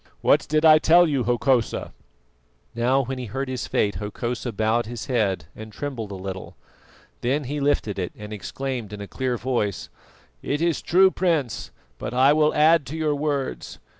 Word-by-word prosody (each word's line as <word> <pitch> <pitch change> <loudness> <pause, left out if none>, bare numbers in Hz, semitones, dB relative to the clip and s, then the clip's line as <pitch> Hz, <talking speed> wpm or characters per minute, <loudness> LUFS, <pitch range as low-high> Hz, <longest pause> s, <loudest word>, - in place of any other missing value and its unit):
What - - +3
did 155 +1 +2
I 155 -1 +8
tell 170 +3 +6
you, 140 -5 0
Hokosa?" 120 0 0 0.8
Now 125 +4 +2
when 130 +1 -5
he 125 - -4
heard 135 +6 -3
his 130 -1 -4
fate, 100 -4 0
Hokosa 120 +5 -4
bowed 110 +2 0
his 120 -1 -6
head 100 - 0
and 110 0 -9
trembled 115 -1 -5
a - - -5
little. 95 0 -7 0.7
Then 135 +5 0
he 145 +3 -4
lifted 140 -8 0
it, 90 - -3
and 105 0 -8
exclaimed 120 0 -5
in 105 - -7
a 100 - -6
clear 130 +1 -2
voice: 115 -5 -2 0.5
"It 145 - -2
is 170 -1 0
true, 190 +2 +4
Prince, 165 - -1 0.3
but - - -5
I 135 +3 +5
will 155 0 +2
add 155 -1 +4
to 155 - -5
your 155 -2 +1
words. 145 -2 -3
130 Hz, 175 wpm, -24 LUFS, 110-145 Hz, 0.8 s, I